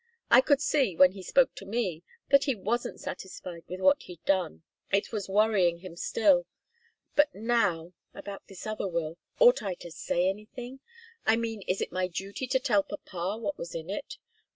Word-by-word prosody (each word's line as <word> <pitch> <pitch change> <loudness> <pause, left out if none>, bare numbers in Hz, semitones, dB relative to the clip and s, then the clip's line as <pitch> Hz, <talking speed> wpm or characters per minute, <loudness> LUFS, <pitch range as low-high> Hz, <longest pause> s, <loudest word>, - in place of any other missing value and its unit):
I 240 +2 +9
could 285 +1 +3
see, 275 - +2
when 185 +2 +7
he 195 0 -9
spoke 260 +8 +3
to - - -10
me, 195 -7 -1 0.3
that 280 0 +6
he 270 -4 +1
wasn't 225 +4 -2
satisfied 180 -2 -7
with 185 +1 -6
what 285 +7 +5
he'd 175 -2 -12
done. 180 - 0 0.3
It 200 +1 +1
was 205 -4 -4
worrying 195 -4 +3
him 175 -1 -10
still. 265 - +3 0.7
But 295 0 +4
now 200 -7 0 0.2
about 200 -1 -9
this 195 -2 -10
other 215 -2 -2
will 170 -2 -3 0.2
ought - - +6
I 190 -3 -3
to 175 - -10
say 175 +2 0
anything? 240 +6 -5 0.5
I 220 - +6
mean, 225 -2 -3
is 185 - 0
it - - -2
my 185 0 0
duty 195 +8 -5
to 260 +1 +2
tell 240 -7 +3
papa 195 0 -5
what 285 +5 -3
was 170 - -6
in 165 +3 -5
it?" 205 - -5
200 Hz, 185 wpm, -29 LUFS, 180-240 Hz, 0.7 s, I